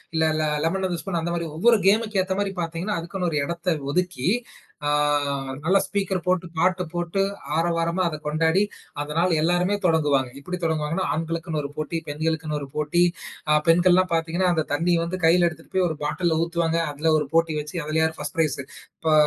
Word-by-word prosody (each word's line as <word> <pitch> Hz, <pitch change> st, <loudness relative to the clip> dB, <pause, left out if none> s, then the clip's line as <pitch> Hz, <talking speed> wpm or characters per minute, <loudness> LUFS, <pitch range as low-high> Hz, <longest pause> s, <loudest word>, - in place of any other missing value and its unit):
இல்ல 160 Hz, 0 st, +3 dB
ல -, -, +1 dB, 0.2 s
lemon 190 Hz, +3 st, 0 dB
and 180 Hz, -, -1 dB
the -, -, -6 dB
spoon 185 Hz, -4 st, -2 dB
அந்த 170 Hz, -, -2 dB
மாரி 170 Hz, -1 st, -2 dB
ஒவ்வொரு 230 Hz, +5 st, +5 dB
கேம்க்கு 215 Hz, -1 st, +3 dB
ஏத்த 190 Hz, 0 st, -2 dB
மாரி 200 Hz, -1 st, -1 dB
பாத்தீங்கன்னா, 170 Hz, +4 st, -2 dB
அதுக்குன்னு 180 Hz, +1 st, -2 dB
ஒரு 150 Hz, -, 0 dB
இடத்த 170 Hz, +2 st, -1 dB, 0.2 s
ஒதுக்கி 180 Hz, -3 st, 0 dB, 0.6 s
அ -, -, +2 dB, 0.7 s
நல்ல 185 Hz, +5 st, +4 dB
ஸ்பீக்கர் 195 Hz, -3 st, -1 dB
போட்டுப் 180 Hz, -2 st, 0 dB
பாட்டு 185 Hz, +2 st, +2 dB
போட்டு 175 Hz, +2 st, -1 dB, 0.3 s
ஆரவாரமா 170 Hz, +2 st, +1 dB
அத 155 Hz, -2 st, -3 dB
கொண்டாடி, 160 Hz, +4 st, +2 dB, 0.4 s
அந்த 145 Hz, +1 st, -5 dB
நாள் 175 Hz, +1 st, +3 dB
எல்லாருமே 175 Hz, +4 st, +2 dB
தொடங்குவாங்க. 145 Hz, -6 st, +2 dB
இப்டி 180 Hz, +6 st, -5 dB
தொடங்குவாங்கன்னா, 160 Hz, +2 st, 0 dB
ஆண்களுக்குன்னு 165 Hz, -1 st, -2 dB
ஒரு 140 Hz, -, -5 dB
போட்டி, 155 Hz, +2 st, -2 dB
பெண்களுக்குன்னு 155 Hz, 0 st, -2 dB
ஒரு 140 Hz, -, -6 dB
போட்டி. 150 Hz, +4 st, +2 dB, 0.5 s
ஆ 150 Hz, -, +5 dB
பெண்கள்லாம் 180 Hz, +2 st, +4 dB
பாத்தீங்கன்னா, 165 Hz, +3 st, +1 dB
அந்தத் 160 Hz, -3 st, -2 dB
தண்ணி 170 Hz, +4 st, +2 dB
வந்து 180 Hz, +2 st, -3 dB
கையில 175 Hz, +1 st, +5 dB
எடுத்துட்டு 165 Hz, 0 st, -14 dB
போய் 185 Hz, -1 st, +3 dB
ஒரு 160 Hz, -, -4 dB
பாட்டில்ல 160 Hz, +1 st, 0 dB
ஊத்துவாங்க. 170 Hz, -1 st, 0 dB
அதுல 155 Hz, +3 st, +1 dB
ஒரு 150 Hz, -, -3 dB
போட்டி 165 Hz, -1 st, +3 dB
வச்சு 150 Hz, +3 st, -9 dB
அதுல 155 Hz, +1 st, +1 dB
யார் 160 Hz, 0 st, -1 dB
ஃபர்ஸ்ட் 150 Hz, +1 st, -5 dB
ப்ரைஸ். 155 Hz, -3 st, +1 dB, 0.4 s
இப்ப 160 Hz, -1 st, +1 dB
165 Hz, 185 wpm, -24 LUFS, 160-180 Hz, 0.7 s, ஒவ்வொரு